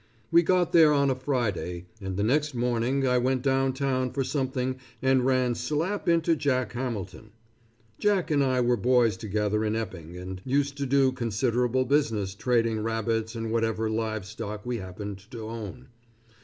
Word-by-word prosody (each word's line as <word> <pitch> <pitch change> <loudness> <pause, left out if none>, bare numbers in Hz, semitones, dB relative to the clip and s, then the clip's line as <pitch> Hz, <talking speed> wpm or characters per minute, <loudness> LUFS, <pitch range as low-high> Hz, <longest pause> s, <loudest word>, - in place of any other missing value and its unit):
We 170 - +7
got 180 0 +2
there 160 -3 +7
on 140 -1 +3
a - - 0
Friday, 115 -10 -2 0.2
and 95 -1 -4
the 100 - +1
next 145 +5 +1
morning 125 +3 0
I 125 0 +3
went 130 +1 0
down 135 -1 +2
town 130 -1 0
for 135 - 0
something 130 -2 -2 0.2
and 130 -1 +2
ran 130 -2 +2
slap 170 - -1
into 165 0 +3
Jack 130 -4 0
Hamilton. 110 -5 -5 0.7
Jack 200 -5 +1
and 145 -2 +3
I 130 -1 +2
were 120 0 +2
boys 120 -1 +3
together 105 +1 -1
in 110 0 0
Epping, 90 -6 -5
and 90 +1 -7
used 140 +1 0
to 140 - -1
do 135 0 +4
considerable 125 +1 0
business 115 -8 +1
trading 115 0 +1
rabbits 110 0 -1
and 115 -1 -3
whatever 115 -1 0
live 110 -2 -2
stock 105 +1 -6
we 120 -1 -2
happened 100 +1 -7
to 115 -3 -7
own. 115 +3 -7
125 Hz, 170 wpm, -27 LUFS, 110-135 Hz, 0.7 s, We